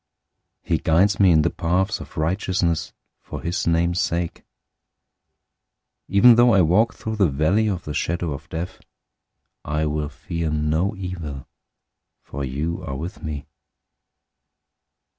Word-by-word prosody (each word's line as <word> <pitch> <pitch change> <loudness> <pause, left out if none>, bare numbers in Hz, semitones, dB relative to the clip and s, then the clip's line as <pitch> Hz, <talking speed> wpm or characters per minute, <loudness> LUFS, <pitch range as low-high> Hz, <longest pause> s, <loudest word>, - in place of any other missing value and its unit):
He - - 0
guides 90 +6 +3
me 95 -2 +6
in 80 -3 +5
the - - +1
paths 95 +5 0
of - - -11
righteousness 85 0 0 0.3
for - - -7
his 85 +1 -2
name's 85 +1 +2
sake. 85 -1 -2 1.7
023:004 95 - -6
Even 120 +5 +8
though 120 -2 +6
I 95 - +6
walk 105 +9 +3
through 110 -1 -5
the 100 -5 +4
valley 80 +10 +2
of 90 -5 -2
the 75 - -5
shadow 85 +1 -1
of 70 +2 -9
death, 85 +3 -5 0.8
I 75 +1 -1
will 75 -1 -2
fear 80 +3 -4
no 75 +7 0
evil, 85 -8 -6 0.8
for 70 +1 -6
you 75 +6 -3
are 65 - -5
with 85 +9 -6
me. 75 -2 -5
85 Hz, 140 wpm, -23 LUFS, 75-95 Hz, 1.7 s, Even